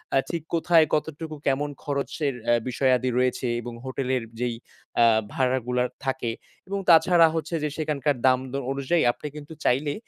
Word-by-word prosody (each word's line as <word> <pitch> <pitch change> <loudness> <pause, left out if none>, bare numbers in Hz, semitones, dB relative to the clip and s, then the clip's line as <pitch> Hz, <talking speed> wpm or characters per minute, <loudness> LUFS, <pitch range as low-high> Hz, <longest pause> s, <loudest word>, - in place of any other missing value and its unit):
আ - - +5
ঠিক 170 -3 -3
কোথায়, 165 -1 +4
কতটুকু, 155 +1 -2
কেমন 140 +2 +1
খরচের 145 0 -2 0.2
এ - - +5 0.2
বিষয়াদি 130 0 +2
রয়েছে 125 0 +1
এবং 120 0 -7
হোটেলের 130 -1 -1 0.2
যেই 120 -1 -1 0.5
আ - - +7 0.3
ভাড়াগুলা 125 -1 0 0.2
থাকে 130 -3 -1 0.4
এবং 200 +1 -2
তাছাড়া 165 0 +7
হচ্ছে 165 +1 -2
যে 150 - 0
সেখানকার 150 -2 0
দাম 130 -1 +4
দ - - -12 0.2
অনুযায়ী 140 +5 +1
আপনি 150 - -8
কিন্তু 150 +1 -9
চাইলে, 145 +4 +2
140 Hz, 155 wpm, -25 LUFS, 130-160 Hz, 0.5 s, আ